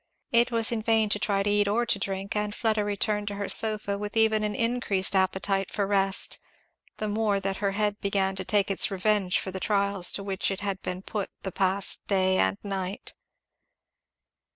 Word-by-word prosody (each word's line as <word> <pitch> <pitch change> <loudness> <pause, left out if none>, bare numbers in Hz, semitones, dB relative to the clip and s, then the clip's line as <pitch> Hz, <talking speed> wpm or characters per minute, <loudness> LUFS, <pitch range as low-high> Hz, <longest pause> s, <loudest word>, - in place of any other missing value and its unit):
It 235 +1 +4
was 230 -1 +1
in 230 -2 -1
vain 220 -1 +2
to 210 - +1
try 195 -1 0
to 205 - 0
eat 205 0 +2
or 230 +4 +1
to 205 - 0
drink; 195 +1 -4
and 210 0 -2
Fleda 220 -3 +1
returned 205 0 -1
to 205 - -3
her 200 0 -3
sofa 215 -2 +2
with 210 +2 -5
even 220 -1 +3
an 210 0 -2
increased 230 -5 0
appetite 190 +1 +1
for 205 - -1
rest, 195 -1 +1 0.6
the 215 - -3
more 210 -1 0
that 195 0 -3
her 200 -1 -1
head 210 0 -1
began 195 -1 0
to 190 - -3
take 200 0 +1
its 195 - +2
revenge 195 -1 +1
for 190 - -4
the 190 - -4
trials 200 -2 +1
to 200 - 0
which 195 -1 -1
it 195 0 -4
had 195 -1 -3
been 185 +1 -5
put 205 -1 -4
the 190 - -3
past 190 +2 0
day 190 -1 +2
and 95 +1 +2
night. 195 -1 -4
200 Hz, 200 wpm, -27 LUFS, 195-210 Hz, 0.6 s, It